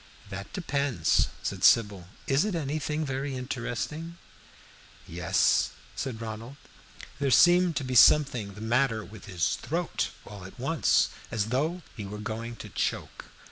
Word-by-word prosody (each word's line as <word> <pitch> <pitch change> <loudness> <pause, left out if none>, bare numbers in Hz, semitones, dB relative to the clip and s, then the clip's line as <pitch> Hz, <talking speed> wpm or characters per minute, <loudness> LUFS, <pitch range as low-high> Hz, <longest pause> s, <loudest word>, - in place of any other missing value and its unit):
"That 100 +1 -7
depends," 140 - +1 0.2
said - - -3
Sybil. 100 -6 +4 0.2
"Is 135 +2 +2
it 210 -3 -1
anything 155 0 -2
very 135 0 -3
interesting?" 130 +6 -4 0.9
"Yes," 90 +3 +2 0.2
said 125 -5 -4
Ronald. 115 +3 -7 0.6
There 140 -1 +1
seemed 175 +4 +5
to 145 - -1
be 130 0 -4
something 125 -6 +5
the 105 - -10
matter 115 -1 +1
with 110 -1 -12
his 90 -6 -1
throat - - -2 0.2
all 100 -2 -10
at 95 +6 -12
once, 140 +5 +2 0.2
as 110 -1 -1
though 155 +8 -1
he 105 - -6
were 105 +2 -6
going 115 +2 -5
to - - -9
choke. - - -3
125 Hz, 140 wpm, -28 LUFS, 105-145 Hz, 0.9 s, seemed